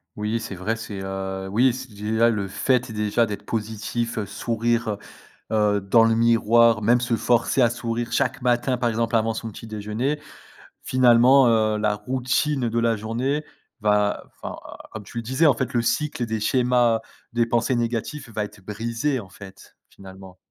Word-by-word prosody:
Oui, 105 +2 -2
c'est 110 - -6
vrai, 95 +5 -2
c'est, 110 -3 -7
heu, 95 0 -4
oui, 120 +4 +3
c'est 130 +1 -7
déjà 110 +3 +1
le 105 -4 -1
fait 125 +5 0
déjà 105 +2 +1
d'être 105 -2 -5
positif, 110 +1 -3
heu, 105 - -3
sourire, 115 +2 -1
heu, 105 - -3 0.8
heu, - - -3
dans 105 +4 +4
le 115 0 +3
miroir, 115 -1 +4
même 120 +3 +4
se 125 -1 0
forcer 120 +3 +2
à 120 - +3
sourire 120 0 -3
chaque - - 0
matin, 125 +1 +1
par 120 -1 0
exemple 115 +1 -1
avant 115 0 +2
son 115 0 -5
petit 105 - -10
déjeuner. 110 +7 -3 0.6
Finalement, 125 +1 +5
heu, 110 -1 +2
la 105 0 +1
routine 130 +2 -1
de 115 +1 0
la 115 -1 +2
journée 120 +8 -2 0.4
va, 105 -1 +1 0.2
enfin - - -5 0.4
comme 110 - -7
tu 100 - -11
le - - -1
disais: 130 +8 +2
«En 145 - +6
fait, 125 +2 -3
le 120 - +2
cycle 140 +1 -1
des 110 -1 -3
schémas 120 0 +2 0.3
des 120 0 +2
pensées 120 +2 +1
négatifs 120 +4 -3
va 105 -1 -2
être 105 -1 -14
brisé», 115 +6 -2
en 100 - -9
fait, 95 0 -14
finalement. 95 -1 -13
115 Hz, 180 wpm, -23 LUFS, 105-120 Hz, 0.8 s, En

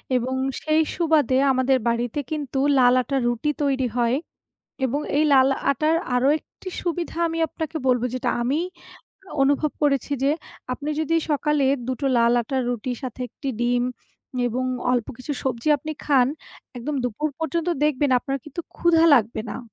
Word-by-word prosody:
এবং 255 +2 0 0.3
সেই 310 +1 +2
সুবাদে 305 -6 +2
আমাদের 260 0 +3
বাড়িতে 235 +4 0
কিন্তু 285 -3 -2 0.2
লাল 250 -1 +6
আটার 270 +1 -1
রুটি 240 +5 0
তৈরি 265 -2 +1
হয়। 240 +1 +2 0.7
এবং 270 +3 0 0.2
এই 305 - +4
লাল 265 0 +6 0.2
আটার 305 +4 +2 0.2
আরো 250 +2 +3
একটি 370 - -12
সুবিধা 345 -1 -3
আমি 330 0 -3
আপনাকে 320 +1 -5
বলব 250 -2 +3
যেটা 255 - -1
আমি 270 +6 +1 0.8
অনুভব 285 +2 +2
করেছি 285 -1 +1
যে 275 - +3 0.4
আপনি 290 +4 -4
যদি 315 +1 0 0.2
সকালে 295 -1 +1 0.2
দুটো 260 +2 -2
লাল 235 0 +4
আটার 260 +2 -1
রুটির 245 +1 -2
সাথে 255 0 -6
একটি 275 +4 -7
ডিম 245 0 +2 0.6
এবং 250 +2 -1 0.3
অল্প 240 -3 +1
কিছু 270 +4 -4
সবজি 255 +1 -2
আপনি 310 +3 -5
খান, 265 -4 +4 0.5
একদম 270 +5 -3
দুপুর 245 +6 -1
পর্যন্ত 330 +2 -1 0.2
দেখবেন 290 -1 +1
আপনার 275 +2 -3
কিন্তু 305 +3 -6 0.2
ক্ষুধা 330 -1 +4
লাগবে 220 -2 0
না। - - -5
270 Hz, 155 wpm, -23 LUFS, 245-300 Hz, 0.8 s, লাল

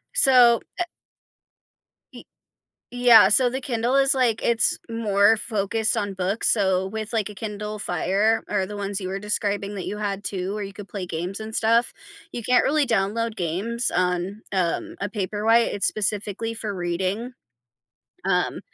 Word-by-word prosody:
So, 250 - +6 0.2
eh - - +2 1.3
Ye - - -12 0.7
yeah, 245 -3 +6
so 245 +4 +5
the 265 +1 -4
Kindle 245 -1 -1
is 275 0 +4
like 240 -4 +1
it's 230 -3 +3
more 220 -1 +3
focused 215 0 0
on 200 -1 -3
books, 190 +4 0
so, 190 -3 +2
with, 220 +2 -6
like, 215 -2 -1
a 210 - -10
Kindle 210 0 -5
Fire 205 +3 0
or 200 -2 0
the 205 +2 -8
ones 200 0 -3
you 185 -1 -5
were 195 - -4
describing 205 0 -2
that 190 - -5
you 210 - -5
had 200 -1 -3
too 190 +1 -3
where 210 - -4
you 195 0 -8
could 205 -1 -10
play 195 -3 -5
games 175 +3 -4
and 220 0 -7
stuff, 230 +2 +2 0.4
you 240 - -5
can't 250 +3 +3
really 295 -1 +1
download 225 +1 -1
games 195 +8 -2
on, 180 +3 -1
um, 180 -3 -1
a 200 - -2
Paperwhite, 215 +3 +1
it's 205 - 0
specifically 215 +2 -1
for 215 -2 -4
reading, 185 +7 -3 0.9
um, - - 0
210 Hz, 165 wpm, -23 LUFS, 195-230 Hz, 1.3 s, So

